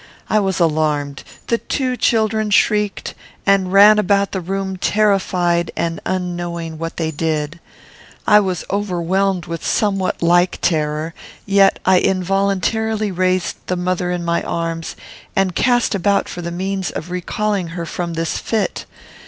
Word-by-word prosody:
I 215 - +4
was 195 -2 -1
alarmed. 150 -4 0 0.2
The 235 - 0
two 255 -2 -2
children 220 -2 +1
shrieked, 210 0 +1 0.3
and 195 -2 +3
ran 205 +2 +7
about 200 -1 +2
the 190 - -3
room 190 +1 -3
terrified 185 -4 +1
and 165 0 -1
unknowing 175 -3 -3
what 165 +1 -5
they 160 -1 -1
did. 155 0 -2 0.7
I 210 0 +6
was 185 -4 -2
overwhelmed 190 -2 0
with 165 0 -6
somewhat 195 -4 0
like 175 +1 +3
terror, 155 0 -1 0.3
yet 195 -1 +4
I 185 -1 +5
involuntarily 200 +3 0
raised 185 0 0
the 180 - 0
mother 180 0 -1
in 175 -1 -2
my 170 0 +1
arms, 165 -1 -3 0.4
and 190 -2 +1
cast 245 +4 +2
about 200 +1 +1
for 175 - -6
the 170 - -4
means 190 +2 -2
of 175 - -6
recalling 195 +1 -1
her 170 0 -5
from 170 +1 -4
this 165 0 -2
fit. 220 -3 -2
185 Hz, 145 wpm, -19 LUFS, 170-200 Hz, 0.7 s, ran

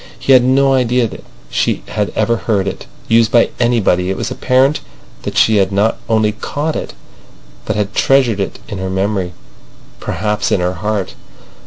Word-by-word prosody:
He 135 - +2
had 125 -1 +6
no 135 +2 +3
idea 125 -2 +2
that - - -10 0.3
she - - 0
had 105 -1 -2
ever 110 +2 +1
heard 105 -4 -1
it 95 - -5 0.2
used 115 -1 +3
by 120 - +4
anybody. 110 -7 +2
It 95 - -2
was - - -3
apparent 130 +3 +2 0.4
that - - -5
she 110 -1 +4
had 95 0 +2
not 100 +3 +1
only 110 -1 +2
caught 145 +8 -3
it, - - -5 0.7
but 105 - -2
had 105 -1 -2
treasured 130 -6 +2
it 95 - -3
in 100 - -6
her 95 0 -3
memory—perhaps 95 +2 -4
in - - +2
her 90 +1 0
heart. 105 +1 -3
110 Hz, 170 wpm, -16 LUFS, 100-125 Hz, 0.7 s, had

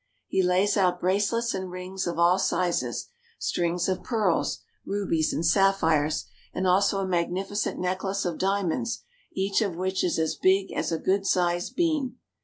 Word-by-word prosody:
He 190 - +1
lays 185 +3 +2
out 180 -2 +2
bracelets 205 +6 +1
and 190 -1 -4
rings 185 +1 -5
of 170 -1 -3
all 175 +2 +4
sizes, 170 -11 -1 0.3
strings 175 0 -1
of 190 -1 -1
pearls, 215 -8 0 0.2
rubies, 190 -6 0
and 165 - -1
sapphires, 165 -5 +2 0.3
and 190 - -1
also 195 +2 +3
a 190 - -2
magnificent 185 +4 -1
necklace 190 +2 -1
of 175 -2 -2
diamonds, 200 +4 -1 0.3
each 195 +2 +1
of 200 -6 -1
which 185 +2 -1
is 175 - +1
as 160 -1 0
big 190 +1 +2
as - - -2
a 165 - 0
good 195 +4 0
sized 175 -1 +1
bean. 310 -7 0
185 Hz, 160 wpm, -26 LUFS, 175-195 Hz, 0.3 s, all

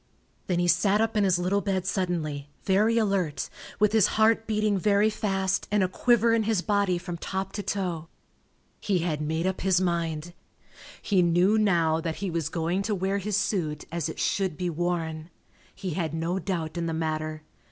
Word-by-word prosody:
Then 180 - 0
he 175 0 +1
sat 200 +3 +3
up 225 0 0
in 210 - +3
his 185 -2 +3
little 185 +3 +1
bed 190 -3 -1
suddenly, 160 -7 -2
very 210 +4 +3
alert, 195 -9 0 0.3
with 210 0 +4
his 220 -4 +5
heart 225 0 +3
beating 215 -2 +1
very 205 +2 +3
fast 195 -3 -1
and 205 -1 +2
a - - +2
quiver 230 +4 +3
in 230 - +3
his 215 -4 0
body 200 -4 +1
from 175 -1 -6
top 190 +2 -3
to 205 - -3
toe. 180 -5 -3 0.7
He 200 -3 0
had 155 -3 -1
made 160 +3 -1
up 190 0 -1
his 185 -1 +3
mind. 170 -2 -2 0.7
He 195 -4 +3
knew 175 +4 +3
now 170 -7 +2
that 165 -1 -3
he 195 -2 -3
was 165 -3 -1
going 170 +3 -1
to 210 +1 -1
wear 195 +2 -1
his 205 +1 -1
suit 165 -8 -1
as 170 -2 -2
it - - -7
should 190 -6 0
be 180 -1 -2
worn. 165 -1 -2 0.5
He 185 - -4
had 160 -1 -2
no 170 +3 -1
doubt 175 -4 -3
in 170 - -2
the 165 - -2
matter. 155 -1 -3
185 Hz, 190 wpm, -27 LUFS, 165-200 Hz, 0.7 s, his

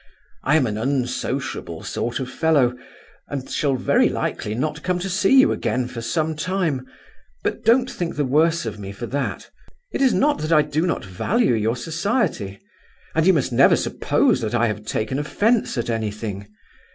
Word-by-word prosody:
I 150 - +2
am 155 -5 +4
an 105 -2 -2
unsociable 125 0 -2
sort 120 +1 -3
of 130 - -3
fellow 145 -5 +3 0.5
and 135 -2 -5
shall 140 -3 0
very 125 - +3
likely 105 - -3
not 150 +4 -2
come 180 +1 0
to 180 +2 -3
see 195 +8 +4
you 265 - +5
again 125 -1 -1
for 120 -2 -7
some 155 +6 -1
time; 160 -5 -1 0.6
but - - -2
don't 250 +2 +4
think 175 -9 -4
the 150 -2 0
worse 160 +5 +2
of 105 - -5
me 100 -1 -7
for 120 +4 -6
that. 140 +4 -3 0.4
It - - -2
is 265 -2 +5
not 295 +1 +2
that 155 +2 -3
I 155 -2 +6
do 150 +4 -1
not 170 - -2
value 180 - +1
your 110 +1 +1
society; 165 - -1 0.5
and 160 +2 +2
you 190 - +7
must 140 -5 0
never 120 - +6
suppose - - +1
that 115 +1 -2
I 120 0 +3
have 105 -1 -3
taken 110 +4 -2
offence 210 - +1
at 120 - -1
anything. 105 -3 -3
140 Hz, 180 wpm, -22 LUFS, 115-170 Hz, 0.6 s, you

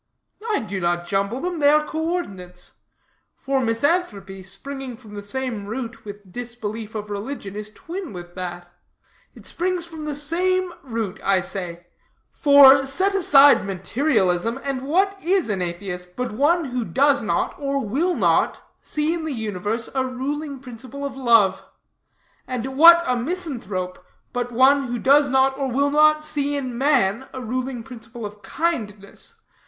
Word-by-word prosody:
"I 425 - +2
do 200 -3 -4
not 175 0 0
jumble 200 +7 -1
them; 355 -1 -3
they 285 -1 +5
are 300 +1 +4
coordinates. 250 - -4 0.6
For 270 0 -1
misanthropy, 230 - -1
springing 265 +6 -7
from 220 -3 -14
the 205 - -6
same 225 -1 -4
root 230 +1 -6
with 205 -2 -10
disbelief 225 -2 -6
of 210 -1 -5
religion, 205 -1 -5
is 210 0 -6
twin 345 - -7
with 175 -2 -9
that. 175 -1 -6 0.7
It - - -15
springs 360 0 -2
from 320 -2 -8
the 300 -1 -3
same 360 +5 +1
root, 225 -6 -4
I 195 -1 +3
say; 175 -2 -6 0.5
for, 280 -2 +7
set 375 +9 +1
aside 290 -7 +6
materialism, 200 - 0
and 275 -2 -2
what 385 +8 +1
is 365 - +1
an 190 -3 -2
atheist, 180 0 -5
but 250 -2 -3
one 300 +9 +2
who 250 -2 -2
does 280 +3 +2
not, 215 - -1
or 280 -1 -1
will 320 - 0
not, - - +2 0.2
see 300 +2 -1
in 340 -2 -4
the 315 - -3
universe 220 0 -3
a 265 -1 +1
ruling 275 +3 -4
principle 255 +2 -8
of 275 -2 -5
love; 230 -7 +3 0.8
and 255 +1 -4
what 340 +3 +8
a 250 - +1
misanthrope, 240 - -4 0.3
but 245 0 -2
one 265 +3 +4
who 245 0 -3
does 280 +3 +4
not, 265 +1 +3
or 275 - 0
will 280 +3 +1
not, 305 +1 +4
see 290 -1 -2
in 260 -4 -3
man 260 -4 +1
a - - -4
ruling 255 0 -3
principle 230 -2 -9
of 205 0 -9
kindness? 210 -13 -4
255 Hz, 155 wpm, -22 LUFS, 205-290 Hz, 0.8 s, what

